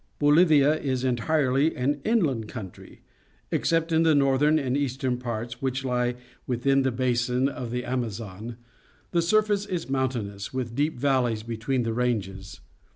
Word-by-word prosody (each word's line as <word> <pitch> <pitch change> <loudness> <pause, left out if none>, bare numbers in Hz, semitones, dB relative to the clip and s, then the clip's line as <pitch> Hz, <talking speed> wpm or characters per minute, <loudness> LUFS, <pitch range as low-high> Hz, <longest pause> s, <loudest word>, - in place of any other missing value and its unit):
— - - -41
Bolii'ia 150 0 +4
is 130 -3 -1
entirety 135 +3 +1
an 140 +3 -1
inland 150 - +1
country. 95 -5 -10 0.5
Ex - - 0
cept 165 0 +1
in 160 0 +3
the 160 -2 +4
northern 140 +2 +3
and 135 -4 -1
eastern 130 -2 -1
parts, 120 -1 -5
which 135 0 -2
lie 125 -1 0 0.3
within 135 +2 +2
the 130 -1 +1
basin 125 +1 +1
of 130 -4 -5
the 125 +1 -3
Amazon, 115 -2 -4 0.5
the 170 - +2
sur 215 +6 +3
face 205 -1 -1
is 175 -8 -4
mountainous, 120 -7 -2
with 125 -3 -4
deep 145 +2 0
valleys 125 -5 +1
be 115 0 -5
tween 125 +3 -1
the 115 -1 -2
ranges. 100 -6 -3
130 Hz, 160 wpm, -26 LUFS, 120-145 Hz, 0.5 s, Bolii'ia